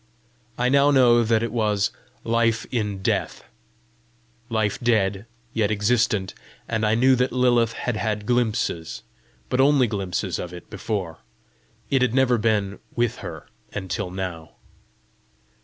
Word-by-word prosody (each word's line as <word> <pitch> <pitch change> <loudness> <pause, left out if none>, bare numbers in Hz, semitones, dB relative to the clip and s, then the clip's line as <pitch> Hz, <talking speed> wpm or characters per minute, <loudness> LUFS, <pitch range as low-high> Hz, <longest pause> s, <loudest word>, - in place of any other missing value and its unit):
I 125 - +1
now 140 +1 +5
know 120 -4 +5
that 115 0 +2
it 115 - -2
was 105 -3 +1 0.3
LIFE 115 0 +1
IN 105 -5 -2
DEATH - - -1 1.1
life 110 -3 0
dead, 105 -3 +1 0.3
yet 110 -3 +1
existent; 105 -2 +1 0.3
and 110 -1 -1
I 110 - +3
knew 130 +3 +5
that 125 +1 +1
Lilith 120 -2 +2
had 120 -3 -3
had 105 -1 -2
glimpses, 110 -9 -1 0.4
but 130 - +1
only 140 -1 +5
glimpses 95 -4 -2
of 90 0 -6
it 90 - -12
before: 100 -5 -4 0.7
it 135 -2 +3
had 125 -1 +1
never 130 -3 +3
been 105 -3 0 0.2
with 120 -1 0
her - - -8 0.3
until 95 -1 -3
now. 90 -3 -6
110 Hz, 135 wpm, -23 LUFS, 100-120 Hz, 1.1 s, now